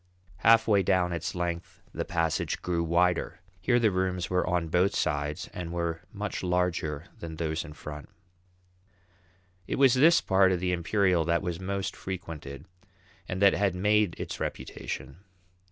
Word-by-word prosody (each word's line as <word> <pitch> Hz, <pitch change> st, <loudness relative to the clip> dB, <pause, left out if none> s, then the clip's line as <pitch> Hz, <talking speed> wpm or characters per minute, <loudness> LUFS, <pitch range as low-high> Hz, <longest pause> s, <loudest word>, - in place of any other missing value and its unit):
Half 115 Hz, 0 st, +5 dB
way 100 Hz, -3 st, +4 dB
down 90 Hz, -2 st, +2 dB
its 85 Hz, +2 st, -3 dB
length 85 Hz, -1 st, -4 dB
the -, -, -2 dB
passage 80 Hz, -2 st, -1 dB
grew 85 Hz, -2 st, 0 dB
wider. 85 Hz, +2 st, +1 dB, 0.2 s
Here 120 Hz, +7 st, +2 dB
the 115 Hz, -3 st, +3 dB
rooms 90 Hz, -1 st, -1 dB
were 90 Hz, 0 st, +1 dB
on 90 Hz, -2 st, 0 dB
both 90 Hz, +5 st, +2 dB
sides 75 Hz, 0 st, -1 dB
and 85 Hz, -2 st, -5 dB
were 85 Hz, -1 st, -2 dB
much 105 Hz, 0 st, -4 dB
larger 90 Hz, -4 st, -1 dB
than 80 Hz, -1 st, -6 dB
those 80 Hz, -1 st, -2 dB
in 75 Hz, -, -10 dB
front. 75 Hz, -1 st, -9 dB, 1.6 s
It -, -, -1 dB
was 135 Hz, -3 st, +5 dB
this 160 Hz, +6 st, +6 dB
part 95 Hz, -1 st, +3 dB
of 90 Hz, -, +1 dB
the 90 Hz, 0 st, 0 dB
Imperial 90 Hz, 0 st, +2 dB
that 85 Hz, +2 st, +1 dB
was 90 Hz, -2 st, -3 dB
most 95 Hz, +1 st, -3 dB
frequented, 80 Hz, -6 st, -7 dB, 0.6 s
and 95 Hz, +2 st, -2 dB
that 100 Hz, -, +7 dB
had 100 Hz, -3 st, +1 dB
made 105 Hz, 0 st, +2 dB
its -, -, -5 dB
reputation. 65 Hz, +3 st, -5 dB
90 Hz, 155 wpm, -28 LUFS, 85-95 Hz, 1.6 s, that